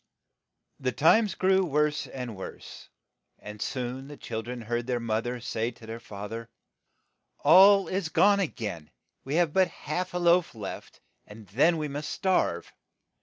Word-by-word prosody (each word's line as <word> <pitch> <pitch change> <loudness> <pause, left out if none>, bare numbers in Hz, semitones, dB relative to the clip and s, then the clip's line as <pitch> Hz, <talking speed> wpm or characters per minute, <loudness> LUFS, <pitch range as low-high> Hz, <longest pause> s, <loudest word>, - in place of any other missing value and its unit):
The 130 -1 -1
times 195 - +4
grew 190 0 +3
wdTse 150 -3 0
and 125 -4 -6
worse, 95 - -10 0.5
and 105 0 -10
soon 130 +1 -4
the 145 0 -10
chil 110 -1 -5
dren 120 +1 -7
heard 120 +1 -3
their 125 -1 0
moth 115 0 -2
er 125 0 -3
say 115 -1 -2
to 120 -1 -14
their 115 +1 -7
fa 105 -3 -8
ther, 115 +2 -7 0.9
"All 195 +6 +7
is 185 -3 -2
gone 200 +4 +4
a 195 - +1
gain. 100 - -6 0.3
We 135 +3 -3
have 170 -3 +2
but 190 -1 +4
half 180 +4 -5
a - - +1
loaf 175 -4 +3
left, 105 -3 -8 0.3
and 105 +1 -12
then 155 - +3
we 155 -1 -2
must 145 +1 -5
starve. 180 - 0
135 Hz, 170 wpm, -27 LUFS, 115-175 Hz, 0.9 s, All